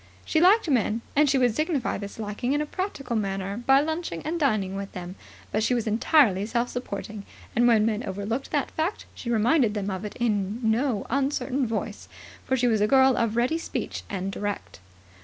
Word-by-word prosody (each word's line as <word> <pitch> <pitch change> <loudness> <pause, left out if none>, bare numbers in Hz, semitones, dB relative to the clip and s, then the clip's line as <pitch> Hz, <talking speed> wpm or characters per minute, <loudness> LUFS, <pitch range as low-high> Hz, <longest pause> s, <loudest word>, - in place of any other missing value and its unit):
She 315 - +2
liked 390 +3 +5
men, 235 -5 +1
and 295 0 +4
she 275 - +3
would 245 -4 +2
signify 310 - -1
this 200 0 -7
liking 220 +4 -2
in 290 - +1
a - - -1
practical 295 - -4
manner 195 -1 -2
by 270 +1 +6
lunching 315 - -3
and 330 +3 -2
dining 215 - +1
with 200 0 -6
them, 180 0 -6 0.4
but 215 - 0
she 245 +3 +2
was 235 - -1
entirely 220 - +3
self 235 +1 0
supporting, 210 -3 -5 0.3
and 240 +1 +4
when 220 -3 +4
men 225 +1 0
overlooked 205 +7 -3
that 290 -3 -1
fact 325 +6 -2
she 235 - -7
reminded 230 0 +3
them 200 -1 -2
of 190 +1 -4
it 210 - -6
in 210 -2 0
no 225 0 +1
uncertain 275 -1 0
voice; 220 -1 -4 0.3
for 260 - 0
she 250 - +1
was 220 -3 +2
a 210 - +4
girl 265 +1 +5
of 230 -1 0
ready 250 +8 +1
speech - - -4
and 195 -1 -3
direct. 205 - -5
235 Hz, 195 wpm, -26 LUFS, 205-275 Hz, 0.4 s, by